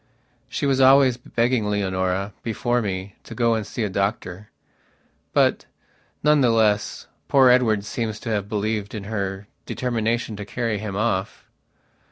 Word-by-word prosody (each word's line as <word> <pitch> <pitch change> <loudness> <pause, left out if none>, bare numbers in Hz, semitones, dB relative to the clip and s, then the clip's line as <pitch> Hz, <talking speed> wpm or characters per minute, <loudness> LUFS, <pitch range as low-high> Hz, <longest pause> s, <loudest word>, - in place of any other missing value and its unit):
She - - -2
was 135 -1 +2
always 130 -1 +6
begging 115 -3 0
Leonora, 95 -1 -1
before 120 +2 -1
me, 95 -2 -4
to - - -10
go 115 -1 +2
and 110 -2 -2
see 115 - -3
a - - 0
doctor. 100 0 -3 0.8
But, - - +2 0.6
none 150 0 +4
the 125 - +4
less, 105 - +1 0.2
poor 135 -2 +5
Edward 110 -5 +3
seems 110 -1 -3
to - - -5
have 100 -2 -2
believed 105 0 -2
in 105 - -5
her 100 -1 -4 0.2
determination 115 -2 -1
to 105 - -5
carry 115 -1 -2
him 105 -2 -5
off. 100 -3 -2
110 Hz, 150 wpm, -23 LUFS, 100-120 Hz, 0.8 s, always